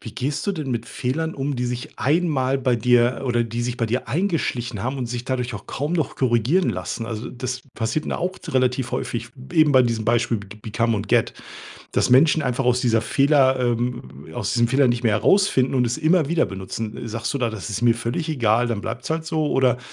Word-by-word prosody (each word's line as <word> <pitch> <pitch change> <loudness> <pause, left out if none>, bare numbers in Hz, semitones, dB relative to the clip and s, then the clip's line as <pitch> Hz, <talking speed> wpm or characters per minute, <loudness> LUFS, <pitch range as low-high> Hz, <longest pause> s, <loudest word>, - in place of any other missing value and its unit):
Wie 110 -1 -9
gehst 140 +6 -2
du 200 - +1
denn 155 -7 -4
mit 120 -1 -2
Fehlern 160 +6 -2
um, 140 -1 -2
die 125 - -1
sich 125 0 -5
einmal 140 -4 +1
bei 125 -2 +1
dir 120 +2 +3
oder 120 -2 +1
die 115 +1 -3
sich 125 0 -2
bei 115 - 0
dir 125 +4 -2
eingeschlichen 130 - -1
haben 130 +3 -2
und 125 -2 -3
sich 120 +1 -5
dadurch 125 -3 -2
auch 105 - -8
kaum 145 +5 -3
noch 160 -4 -1
korrigieren 130 - +2
lassen? 90 +5 -4
Also, 115 +1 -5
das 125 0 -5
passiert 120 +7 -2
mir - - -2
auch 180 +1 -1 0.2
relativ 125 -1 0
häufig, - - -3 0.2
eben 155 -2 +4
bei 130 - +6
diesem 115 -3 -1
Beispiel 115 0 +2
beg 100 +1 -12
become 115 +1 0
und 100 -1 -3
get, - - +2 0.6
dass - - +1
Menschen 155 +4 +5
einfach 125 0 -1
aus 125 0 +3
dieser 115 -2 +2
Fehler, 135 +1 +3
ähm 120 - -2
aus - - -2
diesem 120 0 +2
Fehler 135 +1 +3
nicht 120 0 0
mehr 110 -3 +3
herausfinden 135 - +3
und 125 -1 +3
es 120 +5 -2
immer 160 -1 +3
wieder 170 -1 +2
benutzen. 105 +4 -6
Sagst 115 +5 -3
du - - 0
da: 120 -3 0
„Das 110 -1 -6
ist 110 +2 -4
mir 120 -1 +5
völlig 120 +7 -3
egal, 120 -4 +2
dann 110 -3 -2
bleibt's - - -5
halt 160 0 -2
so“? 155 -2 0
Oder 130 -2 +2
125 Hz, 220 wpm, -22 LUFS, 115-140 Hz, 0.6 s, bei